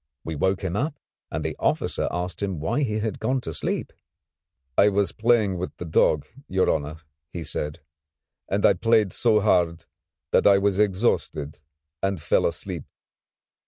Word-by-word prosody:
We 80 - -4
woke 95 +6 0
him 90 -1 -2
up 145 +6 -1 0.3
and - - -4
the - - -2
officer - - 0
asked 90 +2 -4
him 95 -5 -2
why 115 - 0
he 110 -6 0
had 110 -1 -3
gone 130 0 0
to 80 - -5
sleep. - - -2 0.8
"I 100 - +6
was 100 -1 +1
playing 110 -5 +2
with 90 - -5
the 90 - -6
dog, 80 -2 +2 0.2
your 95 0 +2
honour," 75 0 -3 0.4
he 85 - -5
said, 75 -1 -3 0.7
"and 100 +1 +1
I - - +7
played 110 0 +2
so 110 -3 +3
hard 85 -5 +2 0.5
that - - +4
I 100 -1 +7
was 100 0 +1
exhausted 95 -8 0 0.4
and 95 -2 0
fell - - +2
asleep." - - -5
95 Hz, 160 wpm, -25 LUFS, 85-105 Hz, 0.8 s, I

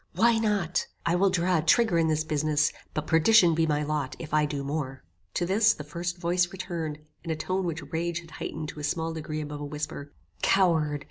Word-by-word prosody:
"Why 230 0 +4
not? 205 -6 0 0.2
I 170 - +2
will 190 +3 +4
draw 180 -1 +2
a - - +1
trigger 175 +2 +3
in 165 - +3
this 155 0 +1
business, 155 -1 +1 0.2
but 155 - -2
perdition 170 +2 +5
be 160 0 +2
my 150 -1 +1
lot 150 -3 -2
if 155 -2 -8
I 150 -1 +3
do 145 -1 -3
more." 140 -2 -4 0.3
To 175 - +1
this, 210 +5 +4
the 150 - -7
first 175 +4 -4
voice 175 0 +1
returned, 170 -5 -4 0.3
in 170 - -7
a 160 - 0
tone 185 +4 -2
which 165 -1 -3
rage 170 +1 -1
had 165 -2 -16
heightened 155 -1 -5
in - - -11
a - - -6
small 160 +2 -1
degree 155 -1 -4
above 150 -1 -6
a - - -3
whisper, 145 -1 -5 0.3
"Coward! 160 -6 +3
160 Hz, 215 wpm, -27 LUFS, 150-175 Hz, 0.3 s, perdition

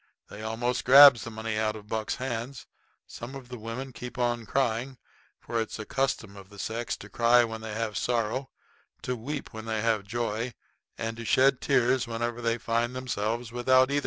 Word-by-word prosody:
They 105 - -8
almost 115 +3 -1
grabs 140 -1 +9
the - - -6
money 110 -1 -3
out 110 0 0
of 105 -1 -10
Buck's 110 0 -2
hands. 125 +1 -4 0.4
Some 120 +4 -8
of 130 -2 -10
the 125 - -6
women 120 +4 -6
keep 125 +2 -8
on 120 -2 0
crying, 130 0 0 0.4
for 115 -1 -2
it's 110 - -5
a 110 - -6
custom 120 -6 -1
of 100 -1 -12
the 105 - -14
sex 115 +4 -3
to - - -10
cry 120 +1 +4
when 110 -1 -4
they 110 -1 -6
have 110 -2 -2
sorrow, 120 +2 -1 0.5
to 125 - -1
weep 140 +5 -6
when 110 0 -7
they 110 -1 -1
have 110 -3 +1
joy, 115 +2 -2 0.4
and 115 0 -4
to 115 - -6
shed 130 +3 +4
tears 130 -2 +2
whenever 120 +1 -3
they 115 0 +1
find 120 +1 -1
themselves 115 -2 -2
without 130 +2 +4
either. 145 - +2
120 Hz, 190 wpm, -28 LUFS, 110-125 Hz, 0.5 s, grabs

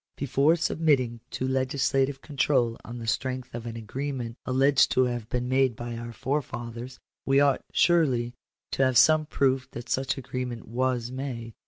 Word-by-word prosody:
Before 140 +3 +3
submitting 145 -8 +1
to 130 - -3
legislative 135 +1 0
control 135 -5 +1
on 120 +1 -8
the 115 - -6
strength 130 +2 -2
of 120 0 -6
an 115 - -5
agreement 120 +1 -4
alleged 135 +1 +4
to 130 - +4
have 120 -3 -2
been 125 0 -1
made 130 -2 +2
by 120 +1 -6
our 115 0 -6
forefathers, 120 -1 -4 0.3
we 135 0 +3
ought 140 -2 +3
surely 130 -9 +3 0.4
to 135 - +1
have 130 -2 +3
some 155 +3 +5
proof 130 -2 +1
that 120 - -8
such 135 +1 0
agreement 125 -3 -5
was 125 0 -1
made. 125 -4 -5
130 Hz, 160 wpm, -27 LUFS, 120-135 Hz, 0.4 s, some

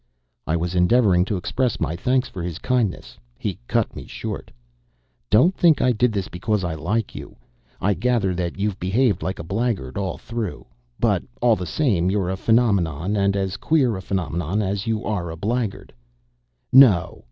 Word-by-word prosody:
I 80 - +1
was 85 +1 -2
endeavoring 90 0 +4
to 100 0 -2
express 125 +6 -1
my 80 - -1
thanks 125 +8 +1
for 95 - -7
his 85 -2 -4
kindness. 120 - -2 0.2
He - - -4
cut - - 0
me - - -8
short. - - -6 0.8
"Don't 160 - +4
think 165 -4 +4
I 125 - +3
did 120 +1 +2
this 100 -3 -2
because 100 +3 -2
I 85 -2 -2
like 100 +8 -2
you. - - -9 0.4
I 100 +2 +2
gather 105 -1 +1
that 85 0 -3
you've 100 -1 -2
behaved 100 +1 +1
like 95 - -3
a - - -6
blackguard 95 - -2
all 95 -3 -3
through. 110 - -5 0.3
But, - - +2 0.2
all 120 -2 +4
the 90 -3 -5
same, 100 - +1
you're 95 -2 0
a - - -1
phenomenon, 100 -6 +1
and 100 -1 +2
as 95 0 -2
queer 135 -8 +2
a 95 - -5
phenomenon 90 0 -2
as 100 +2 -2
you 110 -1 -1
are 90 -5 -2
a 80 - -7
blackguard. 110 +3 -3 0.8
No!" 125 -10 +6
100 Hz, 175 wpm, -22 LUFS, 90-115 Hz, 0.8 s, No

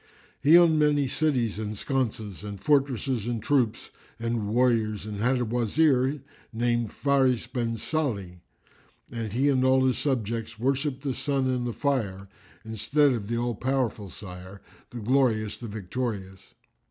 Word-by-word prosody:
He 155 +5 +7
owned 165 -3 +5
many 145 -2 +3
cities 125 -7 0
and 105 -1 -4
sconces 110 -6 -2
and 100 -1 -6
fortresses 135 -5 +1
and 120 -2 -1
troops 125 -2 0 0.3
and 115 -2 -2
warriors 110 -3 +1
and 105 -1 -5
had 125 +3 +2
a 120 - 0
Wazir 130 +4 +2 0.3
named 120 0 0
Fáris 135 -3 +1
bin 115 -2 -2
Sálih,[FN#355] 110 - -3 0.7
and 115 -3 -4
he 135 +4 +2
and 130 -2 +2
all 130 0 +4
his 130 - +1
subjects 115 -4 -2
worshipped 135 +3 -1
the 135 -2 -1
sun 135 0 0
and 125 -1 -1
the - - -1
fire, 105 -10 -1 0.4
instead 140 +7 +2
of 115 -5 -3
the 115 +1 -1
All 120 0 -1
powerful 125 -4 -1
Sire, 95 +1 -10 0.3
the 125 - -9
Glorious, 110 -3 +1
the 120 - -6
Victorious. 100 -2 -5
120 Hz, 150 wpm, -27 LUFS, 110-135 Hz, 0.7 s, He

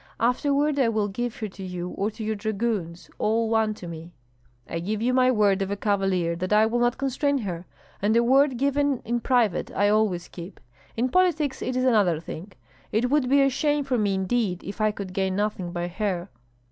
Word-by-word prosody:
Afterward 285 +4 +1
I 250 -4 +3
will 215 -2 0
give 240 +4 -3
her 215 - -1
to 195 0 -10
you 180 -1 -5
or 200 +3 -2
to 220 +1 -8
your 220 0 -1
dragoons, 205 -5 -3
all 225 +1 +1
one 220 -1 +2
to 180 - -9
me!" 165 0 -8 0.6
"I 165 - -3
give 205 +5 -2
my 255 0 +4
word 205 -5 +3
of 195 - -1
a 200 - -1
cavalier 195 -4 0
that 185 +2 -4
I 210 +1 +5
will 235 +2 0
not 240 +1 +1
constrain 275 +1 0
her; 180 -7 -5 0.3
and 215 +3 +3
a 235 - +4
word 265 +1 +4
given 280 0 +1
in 240 +1 0
private 235 -6 +1
I 205 +1 +1
always 205 -5 +1
keep. 175 +2 -10 0.4
In 250 +3 +1
politics 315 -5 +1
it 255 - -2
is 255 - +1
another 205 -10 +3
thing. 170 +4 -8 0.4
It 240 +4 +1
would 285 -4 +2
be 280 +1 +5
a 275 - +4
shame 295 +2 +1
for 260 -3 0
me 200 -2 +1
indeed 190 -1 -1
if 200 +3 -6
I 215 - +4
could 200 -3 -6
gain 190 -1 0
nothing 205 -3 -2
by 175 0 -3
her." 185 -1 -3
215 Hz, 210 wpm, -25 LUFS, 190-250 Hz, 0.6 s, I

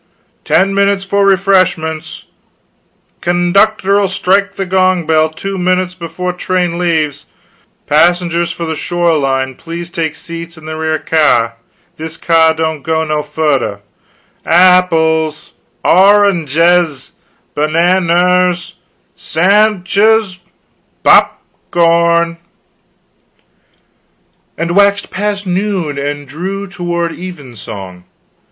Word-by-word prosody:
ten 195 +1 +2
minutes 200 0 +1
for 200 0 +1
refreshments 185 -5 0 1.0
knductr'll 195 +3 +2
strike 195 +1 +1
the 195 - -4
gong 185 -2 +1
bell 160 0 +2
two 195 +4 -6
minutes 185 0 0
before 180 0 -5
train 180 -1 -2
leaves 155 -4 -1 0.6
passengers 170 +2 +1
for 170 - -5
the 160 - -3
Shore 175 +1 0
line 135 -1 -1
please 170 +4 -8
take 160 -3 -3
seats 170 +1 -9
in 155 - -14
the 155 0 -6
rear 160 0 -1
k'yar, 135 -9 +1 0.4
this 160 +1 -7
k'yar 160 -1 +3
don't 160 -2 -2
go 160 +2 -1
no 155 -1 -1
furder 145 -9 -2 0.6
ahh 180 +2 +5
pls, 160 -1 -1 0.3
aw 190 +3 +5
rnjz, 170 -5 +1 0.4
b'_nan_ners, 175 +3 +1 0.4
s - - -9
a 200 +6 +5
n 210 -5 -6
d'ches, 200 0 +1 0.6
p - - +2
op - - +4 0.3
corn!" 170 0 +2 2.2
"and 170 +2 -2
waxed 200 0 +2
past 205 0 -3
noon 180 -6 -2
and 145 0 -4
drew 190 +8 -5
toward 175 -3 -3
evensong. 120 - -9
170 Hz, 110 wpm, -13 LUFS, 160-185 Hz, 2.2 s, ahh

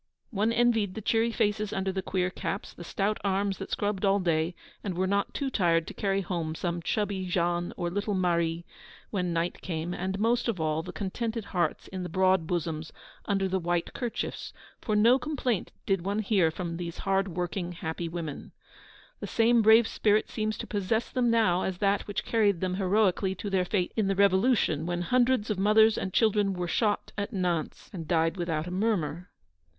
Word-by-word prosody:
One 215 +1 +1
envied 230 -5 +2
the 220 - -4
cheery 225 +2 +2
faces 210 -1 0
under 190 0 -1
the 190 0 -2
queer 185 -1 -1
caps, 195 +1 -4
the 175 - -10
stout 200 +5 -1
arms 195 0 0
that - - -6
scrubbed 205 -1 -1
all 195 0 +4
day, 170 -1 0 0.3
and 190 -4 -3
were 185 - +1
not 200 +1 0
too 275 -2 -2
tired 165 -6 +2
to - - -8
carry 195 -1 0
home 170 -4 -3
some 170 0 -2
chubby 195 0 -1
Jean 175 -1 0
or 175 -1 -2
little 205 +2 -1
Marie 170 -2 0 0.5
when 180 -4 -1
night 170 +1 -1
came; 170 -1 -3
and, 190 +2 -3
most 235 +4 +1
of 220 -6 -1
all, 155 0 0
the 180 - -7
contented 220 +2 -3
hearts 175 -5 -1
in 190 -1 -6
the 180 - -4
broad 185 -1 +2
bosoms 165 -2 -2 0.3
under 195 -2 +1
the 190 0 0
white 175 0 -1
kerchiefs, 240 -3 -4 0.3
for 215 - -1
no 235 +5 +5
complaint 255 - -2
did 195 -3 +1
one 200 +3 -2
hear 200 -5 +2
from 170 0 -4
these 170 -1 -5
hard 195 0 +2
working, 175 0 -3
happy 165 0 -4
women. 165 -4 -6 0.7
The - - -5
same 230 +1 +4
brave 220 +1 +6
spirit 210 0 +2
seems 215 -1 -2
to - - -5
possess 210 +3 -1
them 250 -2 +1
now 220 -6 +3
as 190 -2 -2
that 200 +1 +1
which 205 -1 -3
carried 205 -6 +2
them 185 0 -1
heroically 190 0 +1
to 200 +2 -5
their 185 -1 +2
fate 180 -1 0
in 215 -3 +1
the 195 - +1
Revolution, 190 - +3
when 175 0 -1
hundreds 250 0 +2
of 200 - -2
mothers 220 +2 +5
and 190 - -3
children 205 -2 +2
were 180 -1 -2
shot 205 +4 0
at 205 - -3
Nantes 180 -6 -2
and 165 -5 -6
died 165 0 +2
without 165 -4 -2
a 180 - -6
murmur. 180 -5 -1
190 Hz, 195 wpm, -28 LUFS, 175-210 Hz, 0.7 s, brave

